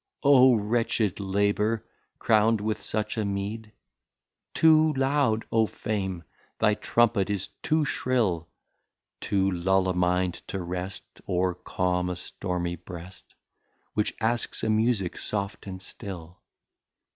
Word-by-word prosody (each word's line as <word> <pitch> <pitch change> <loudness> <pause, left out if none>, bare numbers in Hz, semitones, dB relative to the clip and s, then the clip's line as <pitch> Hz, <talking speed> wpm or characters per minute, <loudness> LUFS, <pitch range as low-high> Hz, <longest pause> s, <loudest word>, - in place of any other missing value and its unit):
O 130 -3 +7
Wretched 110 -2 0
Labour 100 +3 0 0.3
crown'd 110 0 +3
with 105 +1 -2
such 110 +1 -2
a - - +1
Meed! 100 +2 -4 0.8
Too 155 -1 +5
loud, 135 -4 +1
O 110 -1 +3
Fame! 95 -6 -3 0.3
thy 105 -1 +3
Trumpet 110 -2 +2
is, 100 -2 -2
too 155 -1 +1
shrill, 110 - 0 0.7
To 95 -1 +1
lull 95 +1 +2
a 95 - +1
Mind 90 0 +1
to 95 - -4
Rest, 90 +2 -4 0.2
Or 90 0 +1
calme 90 0 -1
a 90 - -2
stormy 90 0 -3
Breast, 90 +2 -11 0.6
Which 105 - 0
asks 115 +2 -1
a 110 - +2
Musick 110 -4 +1
soft 100 -1 -3
and 95 -1 -6
still. 90 -3 -9
100 Hz, 120 wpm, -27 LUFS, 90-115 Hz, 0.8 s, O